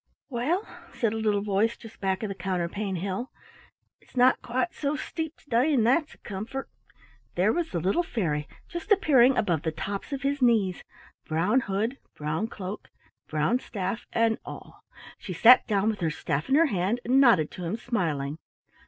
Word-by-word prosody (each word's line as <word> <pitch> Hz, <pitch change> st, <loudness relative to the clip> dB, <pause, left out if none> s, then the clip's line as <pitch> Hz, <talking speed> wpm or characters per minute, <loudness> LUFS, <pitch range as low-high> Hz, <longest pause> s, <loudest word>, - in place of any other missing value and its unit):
"Well," 305 Hz, -, 0 dB, 0.3 s
said 225 Hz, -3 st, 0 dB
a -, -, -2 dB
little 210 Hz, -2 st, +1 dB
voice 210 Hz, +3 st, +1 dB
just 225 Hz, -1 st, -14 dB
back 190 Hz, +1 st, 0 dB
of 215 Hz, -, -2 dB
the -, -, -2 dB
counterpane 190 Hz, +1 st, -2 dB
hill, 195 Hz, +7 st, -3 dB, 0.7 s
"it's -, -, -19 dB
not 250 Hz, +1 st, +5 dB
quite 260 Hz, +9 st, -1 dB
so 290 Hz, 0 st, -1 dB
steep 320 Hz, +1 st, -5 dB
to -, -, -26 dB
day, 255 Hz, +6 st, +3 dB
and 230 Hz, -4 st, +3 dB
that's 295 Hz, +6 st, +2 dB
a -, -, -25 dB
comfort." 215 Hz, +7 st, -6 dB, 0.6 s
There -, -, +3 dB
was 340 Hz, -1 st, -1 dB
the 175 Hz, -, -2 dB
little 190 Hz, -, +1 dB
fairy 160 Hz, -, -2 dB, 0.2 s
just 345 Hz, +5 st, -7 dB
appearing 270 Hz, -10 st, +5 dB
above 170 Hz, -7 st, +1 dB
the 160 Hz, -1 st, -1 dB
tops 195 Hz, -, -5 dB
of 275 Hz, -2 st, -4 dB
his 280 Hz, 0 st, 0 dB
knees, 215 Hz, -7 st, +2 dB, 0.2 s
— -, -, -28 dB
brown 180 Hz, +10 st, +2 dB
hood, 225 Hz, +4 st, -2 dB, 0.2 s
brown 155 Hz, +8 st, -2 dB
cloak, 200 Hz, -2 st, -7 dB, 0.4 s
brown 155 Hz, +11 st, +1 dB
staff, 200 Hz, -1 st, -4 dB
and 230 Hz, -1 st, +2 dB
all. -, -, -10 dB, 0.4 s
She 185 Hz, -, -6 dB
sat 235 Hz, +9 st, +7 dB
down 210 Hz, 0 st, +2 dB
with 210 Hz, -, -7 dB
her 165 Hz, -3 st, 0 dB
staff 150 Hz, -1 st, -3 dB
in 270 Hz, -, +4 dB
her 330 Hz, +3 st, +6 dB
hand 205 Hz, -, 0 dB
and 260 Hz, +3 st, +4 dB
nodded 190 Hz, -, +5 dB
to 180 Hz, -, -8 dB
him, 175 Hz, +6 st, -2 dB
smiling. 160 Hz, -, -2 dB
215 Hz, 185 wpm, -27 LUFS, 185-255 Hz, 0.7 s, sat